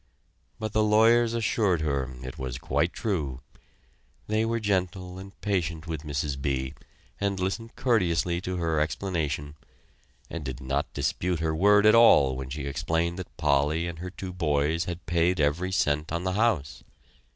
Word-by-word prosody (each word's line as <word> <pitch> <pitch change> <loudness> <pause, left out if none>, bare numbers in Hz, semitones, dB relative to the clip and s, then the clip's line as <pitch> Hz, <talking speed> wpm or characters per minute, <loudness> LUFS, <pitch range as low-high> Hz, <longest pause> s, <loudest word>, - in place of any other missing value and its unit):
But 110 -1 -4
the 110 - +3
lawyers 115 +2 +4
assured 110 -6 +1
her 70 -4 -1
it 65 0 -7
was 65 -2 -4
quite 75 +6 0
true. 75 - -2 0.8
They 110 +1 +1
were 115 +1 0
very 115 - -2
gentle 95 -2 -1
and 95 +1 -12
patient 85 -5 -1
with 80 -3 -4
Mrs. 70 -2 -3
B. 65 -1 -1 0.5
and 100 -1 -1
listened 110 +5 -3
courteously 90 -9 +1
to 90 0 -3
her 80 -3 0
explanation, 75 -2 -2 0.7
and 85 - -6
did 65 -2 -5
not 70 +2 -2
dispute 90 -2 -1
her 80 -1 0
word 105 +4 +5
at 110 - +7
all 70 - +6
when 65 0 -6
she 70 +1 -5
explained 80 +5 -1
that 95 - -9
Polly 75 +4 +2
and 85 -1 -6
her 90 +1 -5
two 95 0 -7
boys 80 -1 +1
had 85 0 -6
paid 85 +1 +1
every 80 +6 +1
cent 75 -4 0
on 85 +1 -2
the 95 0 -1
house. 100 -9 0
85 Hz, 165 wpm, -27 LUFS, 75-95 Hz, 0.8 s, at